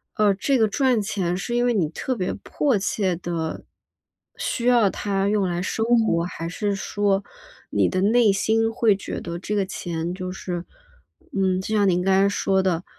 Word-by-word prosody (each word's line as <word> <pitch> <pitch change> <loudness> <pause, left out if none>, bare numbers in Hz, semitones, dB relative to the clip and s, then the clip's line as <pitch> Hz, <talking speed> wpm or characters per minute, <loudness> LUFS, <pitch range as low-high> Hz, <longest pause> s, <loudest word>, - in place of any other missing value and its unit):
呃， 210 -2 +4
这 260 +8 +1
个 220 -3 +3
赚 250 +1 +2
钱 190 -4 -1
是 195 +6 -4
因 240 - +2
为 245 - +2
你 180 -8 +1
特 255 +10 -3
别 185 -5 -2
迫 275 -7 0
切 195 -1 0
地 165 -2 -4 0.7
需 240 - -2
要 240 -5 +5
它 195 0 -1
用 205 -1 +1
来 175 0 -2
生 220 +4 -1 0.2
活， 170 -5 +1
还 170 -1 -5
是 200 +4 -2
说 200 0 0 0.5
你 - - +2
的 185 - -1
内 220 +2 +4
心 225 +3 +1
会 225 -3 +3
觉 195 - -5
得 170 0 -5
这 200 +4 -4
个 200 -2 +1
钱 170 -2 -4
就 185 0 -5
是 180 -2 -5 0.7
嗯， 190 -2 +1
就 215 +3 -2
像 205 -2 +3
您 180 0 +2
刚 190 +1 +2
才 195 +1 +4
说 190 -1 +1
的， 180 -2 0
195 Hz, 205 characters per minute, -23 LUFS, 180-215 Hz, 0.7 s, 要